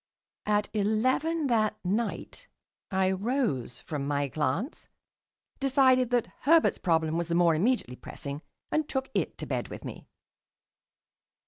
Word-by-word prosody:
At 210 Hz, 0 st, +2 dB
eleven 255 Hz, +10 st, +1 dB
that 215 Hz, -4 st, +2 dB
night 230 Hz, -, -2 dB, 0.4 s
I 190 Hz, -1 st, +2 dB
rose 195 Hz, -, -1 dB
from 145 Hz, -3 st, -4 dB
my 145 Hz, -1 st, 0 dB
glance, 155 Hz, -, -2 dB, 0.7 s
decided 260 Hz, -2 st, +4 dB
that 245 Hz, -2 st, +2 dB
Herbert's 325 Hz, +3 st, +4 dB
problem 160 Hz, -2 st, +1 dB
was 170 Hz, -, -2 dB
the 170 Hz, -, 0 dB
more 170 Hz, -1 st, +5 dB
immediately 170 Hz, -, 0 dB
pressing, 140 Hz, +1 st, -7 dB, 0.3 s
and 310 Hz, -1 st, 0 dB
took 265 Hz, 0 st, -2 dB
it -, -, -1 dB
to -, -, -5 dB
bed -, -, -2 dB
with -, -, -9 dB
me. -, -, -8 dB
210 Hz, 130 wpm, -28 LUFS, 160-260 Hz, 0.7 s, more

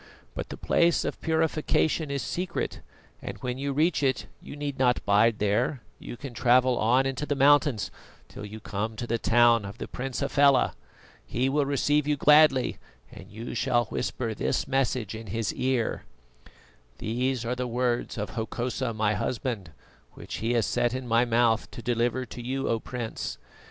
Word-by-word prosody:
But -, -, -5 dB
the -, -, -7 dB
Place 170 Hz, 0 st, +2 dB
of -, -, -4 dB
Purification 160 Hz, -1 st, +1 dB
is 140 Hz, -1 st, -2 dB
secret, 180 Hz, 0 st, -3 dB, 0.4 s
and -, -, -6 dB
when 125 Hz, 0 st, -3 dB
you 140 Hz, +1 st, -2 dB
reach 155 Hz, +3 st, +2 dB
it 130 Hz, -3 st, +1 dB, 0.2 s
you -, -, -9 dB
need 145 Hz, -2 st, -4 dB
not 125 Hz, -2 st, +2 dB
bide 105 Hz, +2 st, +4 dB
there, 115 Hz, +5 st, 0 dB, 0.2 s
you 120 Hz, -, -8 dB
can 135 Hz, -2 st, -8 dB
travel 125 Hz, +2 st, +4 dB
on 125 Hz, +5 st, +3 dB
into 135 Hz, +2 st, -2 dB
the 145 Hz, -, 0 dB
mountains 140 Hz, -4 st, +3 dB, 0.4 s
till -, -, -10 dB
you 105 Hz, +1 st, -8 dB
come 110 Hz, +1 st, -4 dB
to 120 Hz, -, -4 dB
the 115 Hz, 0 st, -1 dB
town 120 Hz, -1 st, +4 dB
of 100 Hz, 0 st, -8 dB
the -, -, -6 dB
Prince 130 Hz, +1 st, -4 dB
Hafela. 140 Hz, -1 st, +4 dB, 0.5 s
He 130 Hz, +3 st, -1 dB
will 145 Hz, 0 st, +1 dB
receive 145 Hz, +1 st, +1 dB
you 150 Hz, -1 st, +1 dB
gladly, 150 Hz, -2 st, +5 dB, 0.3 s
and -, -, -12 dB
you 115 Hz, +3 st, -7 dB
shall 120 Hz, -1 st, +1 dB
whisper 115 Hz, -3 st, -3 dB
this 145 Hz, -, -1 dB
message 130 Hz, -5 st, 0 dB
in 110 Hz, 0 st, -8 dB
his 110 Hz, +3 st, -2 dB
ear: 130 Hz, -2 st, -1 dB, 0.9 s
"'These 125 Hz, +2 st, -1 dB
are 125 Hz, +2 st, -1 dB
the 125 Hz, 0 st, -3 dB
words 120 Hz, 0 st, -1 dB
of 105 Hz, 0 st, -3 dB
Hokosa, 120 Hz, +1 st, -3 dB
my 110 Hz, -1 st, +1 dB
husband, 110 Hz, -2 st, -3 dB, 0.4 s
which -, -, -7 dB
he 115 Hz, +2 st, -1 dB
has 115 Hz, -3 st, +2 dB
set 120 Hz, +4 st, 0 dB
in 130 Hz, -1 st, -5 dB
my 115 Hz, +1 st, +3 dB
mouth 115 Hz, -1 st, +2 dB
to 120 Hz, -, -9 dB
deliver 120 Hz, +1 st, 0 dB
to 120 Hz, -, -9 dB
you, 130 Hz, +3 st, -2 dB
O 115 Hz, -, +1 dB
Prince. 120 Hz, -1 st, -5 dB
125 Hz, 175 wpm, -27 LUFS, 115-135 Hz, 0.9 s, gladly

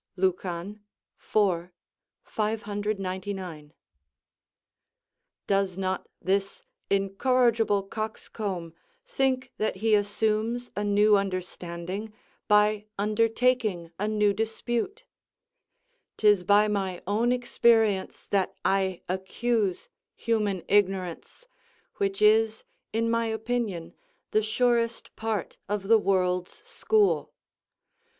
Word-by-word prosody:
Lucan, 185 Hz, +2 st, -2 dB, 0.4 s
iv. 180 Hz, -5 st, +1 dB, 0.5 s
599.] 200 Hz, -6 st, -3 dB, 1.7 s
does 195 Hz, -2 st, +1 dB
not 190 Hz, -1 st, -2 dB
this 195 Hz, +2 st, -1 dB, 0.3 s
incorrigible 215 Hz, +1 st, +2 dB
coxcomb 200 Hz, -4 st, -5 dB, 0.3 s
think 265 Hz, -, 0 dB
that 215 Hz, -, 0 dB
he 215 Hz, +3 st, +1 dB
assumes 215 Hz, +3 st, 0 dB
a 205 Hz, -, -1 dB
new 205 Hz, +1 st, +4 dB
understanding 185 Hz, +1 st, -3 dB, 0.4 s
by 210 Hz, 0 st, +3 dB
undertaking 215 Hz, -3 st, +1 dB
a 210 Hz, -, 0 dB
new 210 Hz, -1 st, +2 dB
dispute? 235 Hz, -, -2 dB, 1.1 s
'Tis 210 Hz, -3 st, +5 dB
by 205 Hz, +3 st, +4 dB
my 195 Hz, -4 st, -2 dB
own 220 Hz, +5 st, +1 dB
experience 225 Hz, -5 st, +2 dB
that 195 Hz, -1 st, 0 dB
I 190 Hz, -2 st, +1 dB
accuse 190 Hz, +2 st, -1 dB, 0.3 s
human 210 Hz, -5 st, -1 dB
ignorance, 195 Hz, -, 0 dB, 0.5 s
which 195 Hz, +1 st, -1 dB
is, 220 Hz, +1 st, +4 dB, 0.3 s
in 225 Hz, +1 st, 0 dB
my 230 Hz, 0 st, +1 dB
opinion, 220 Hz, -6 st, -2 dB, 0.4 s
the 215 Hz, -, +3 dB
surest 230 Hz, +1 st, 0 dB
part 220 Hz, -4 st, -3 dB
of 205 Hz, -2 st, -2 dB
the 225 Hz, +1 st, +6 dB
world's 180 Hz, -2 st, 0 dB
school. 425 Hz, -2 st, +1 dB
205 Hz, 90 wpm, -27 LUFS, 190-225 Hz, 1.7 s, the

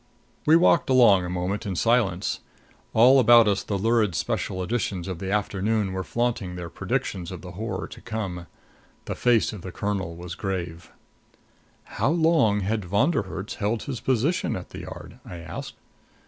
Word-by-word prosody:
We 155 Hz, -, +7 dB
walked 170 Hz, -2 st, +4 dB
along 115 Hz, -8 st, +6 dB
a -, -, -4 dB
moment 90 Hz, +3 st, -2 dB
in 95 Hz, -2 st, -3 dB
silence. 105 Hz, -4 st, +1 dB, 0.5 s
All 125 Hz, +4 st, +6 dB
about 120 Hz, -2 st, +7 dB
us 100 Hz, -2 st, +1 dB
the 100 Hz, -, -3 dB
lurid 110 Hz, -2 st, +2 dB
special 95 Hz, +3 st, -2 dB
editions 95 Hz, -4 st, -2 dB
of 90 Hz, -3 st, -5 dB
the 95 Hz, +1 st, -4 dB
afternoon 105 Hz, 0 st, 0 dB
were 95 Hz, 0 st, -3 dB
flaunting 115 Hz, -5 st, -2 dB
their 85 Hz, -2 st, -7 dB
predictions 90 Hz, -3 st, -3 dB
of 90 Hz, -, -7 dB
the 90 Hz, -, -8 dB
horror 110 Hz, +6 st, -4 dB
to -, -, -11 dB
come. 95 Hz, -7 st, -5 dB, 0.6 s
The -, -, -3 dB
face 120 Hz, -3 st, +2 dB
of 105 Hz, -, -8 dB
the 95 Hz, -, -7 dB
colonel 95 Hz, -5 st, -3 dB
was 85 Hz, 0 st, -7 dB
grave. 90 Hz, -4 st, -4 dB, 0.9 s
"How -, -, -1 dB
long 160 Hz, -11 st, +3 dB
had 105 Hz, +2 st, -1 dB
Von 100 Hz, -, +2 dB
der -, -, +1 dB
Herts 95 Hz, +3 st, -5 dB
held 110 Hz, +1 st, -1 dB
his 130 Hz, -5 st, -5 dB
position 130 Hz, -, 0 dB
at -, -, -7 dB
the -, -, -8 dB
Yard?" -, -, -10 dB
I 90 Hz, -, -9 dB
asked. 85 Hz, -1 st, -7 dB
100 Hz, 175 wpm, -25 LUFS, 90-115 Hz, 0.9 s, We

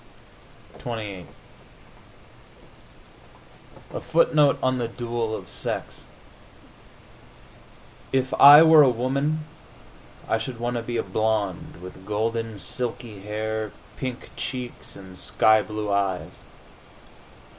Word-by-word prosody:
XXVIII 105 Hz, -6 st, -6 dB, 2.7 s
A -, -, -4 dB
FOOTNOTE 150 Hz, -3 st, +3 dB
ON 130 Hz, 0 st, +1 dB
THE 120 Hz, -, -1 dB
DUEL 115 Hz, -1 st, -3 dB
OF -, -, -8 dB
SEX -, -, -5 dB, 2.1 s
If 130 Hz, 0 st, 0 dB
I 145 Hz, +3 st, +11 dB
were 160 Hz, -1 st, +8 dB
a 140 Hz, -, +6 dB
woman 140 Hz, +6 st, -1 dB, 0.8 s
I 110 Hz, -, +1 dB
should 115 Hz, +1 st, -6 dB
want 120 Hz, +1 st, -2 dB
to -, -, -2 dB
be 120 Hz, +1 st, -4 dB
a -, -, 0 dB
blonde, 105 Hz, -2 st, -1 dB
with 90 Hz, +1 st, -10 dB
golden, 115 Hz, +1 st, -2 dB
silky 120 Hz, -2 st, -5 dB
hair, 110 Hz, +1 st, -3 dB, 0.2 s
pink 130 Hz, -1 st, -6 dB
cheeks 125 Hz, -1 st, -6 dB
and 95 Hz, -1 st, -12 dB
sky 110 Hz, 0 st, +4 dB
blue 105 Hz, -1 st, -4 dB
eyes. 100 Hz, -2 st, -1 dB
115 Hz, 100 wpm, -24 LUFS, 105-130 Hz, 2.7 s, I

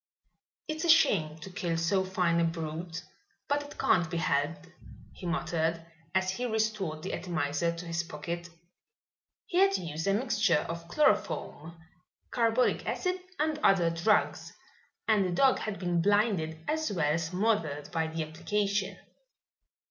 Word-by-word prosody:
"It's 310 Hz, 0 st, -3 dB
a 340 Hz, -, 0 dB
shame 160 Hz, -, +4 dB
to 190 Hz, -, -8 dB
kill 175 Hz, -2 st, -2 dB
so 170 Hz, +4 st, +2 dB
fine 180 Hz, -3 st, +1 dB
a -, -, +3 dB
brute, 165 Hz, +1 st, -3 dB, 0.4 s
but 290 Hz, +1 st, +1 dB
it 290 Hz, 0 st, -11 dB
can't 175 Hz, -3 st, +2 dB
be 170 Hz, -, -2 dB
helped," 160 Hz, -1 st, 0 dB, 0.5 s
he 180 Hz, -, -7 dB
muttered 165 Hz, -1 st, -1 dB, 0.3 s
as 190 Hz, 0 st, +2 dB
he 245 Hz, +6 st, -3 dB
restored 215 Hz, -8 st, -1 dB
the -, -, -3 dB
atomizer 170 Hz, -2 st, -1 dB
to 170 Hz, +1 st, -7 dB
his 170 Hz, 0 st, -1 dB
pocket. 170 Hz, +1 st, -6 dB, 1.0 s
He 365 Hz, -4 st, 0 dB
had 390 Hz, 0 st, +5 dB
used 160 Hz, 0 st, -4 dB
a 195 Hz, -, +3 dB
mixture 215 Hz, -, +2 dB
of 170 Hz, 0 st, -6 dB
chloroform, 170 Hz, -, 0 dB, 0.5 s
carbolic 235 Hz, +1 st, +2 dB
acid 365 Hz, 0 st, -1 dB, 0.2 s
and 305 Hz, 0 st, 0 dB
other 180 Hz, -, +4 dB
drugs, 170 Hz, +6 st, +1 dB, 0.6 s
and 215 Hz, -3 st, +4 dB
the 185 Hz, -, -1 dB
dog 265 Hz, +8 st, +4 dB
had 215 Hz, -2 st, -4 dB
been 175 Hz, -2 st, 0 dB
blinded 200 Hz, -5 st, +2 dB
as 315 Hz, -3 st, 0 dB
well 150 Hz, -6 st, +1 dB
as 165 Hz, 0 st, -1 dB
smothered 180 Hz, -6 st, -1 dB
by 160 Hz, -1 st, 0 dB
the 160 Hz, 0 st, -3 dB
application. 195 Hz, +5 st, -1 dB
175 Hz, 150 wpm, -30 LUFS, 165-215 Hz, 1.0 s, had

